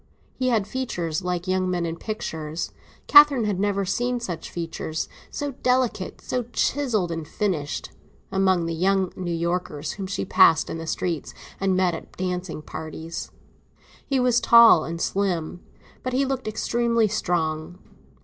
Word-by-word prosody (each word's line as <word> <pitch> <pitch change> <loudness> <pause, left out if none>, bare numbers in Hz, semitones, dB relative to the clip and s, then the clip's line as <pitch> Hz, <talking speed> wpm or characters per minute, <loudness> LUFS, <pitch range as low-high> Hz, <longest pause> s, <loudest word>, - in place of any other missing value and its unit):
He 255 - -2
had 225 -5 +2
features 185 -10 -3
like 180 0 -2
young 185 0 +1
men 175 -1 0
in 165 0 -3
pictures; 160 -6 -4 0.3
Catherine 290 -4 +7
had 200 -3 -1
never 200 -1 0
seen 245 +5 0
such 180 -8 -5
features—so 170 - -5
delicate, 250 -6 0
so 250 -2 -2
chiselled 225 -13 0
and 165 -2 -4
finished—among 185 +1 -2
the 165 - -2
young 190 +2 +1
New 180 -2 -4
Yorkers 170 -3 -2
whom 195 -2 -5
she 190 - -3
passed 160 -3 +5
in 165 - -4
the 165 - -6
streets 165 -1 -3 0.2
and 190 -1 +1
met 185 -2 +2
at 165 - -9 0.5
parties. 160 +1 -6 0.7
He 270 -2 0
was 245 -1 +3
tall 235 -7 +7
and 165 0 -5
slim, 180 -3 -1 0.4
but 255 - -3
he 270 +2 +2
looked 265 -3 -3
extremely 235 +1 +1
strong. 175 -4 -1
185 Hz, 140 wpm, -24 LUFS, 165-235 Hz, 0.7 s, Catherine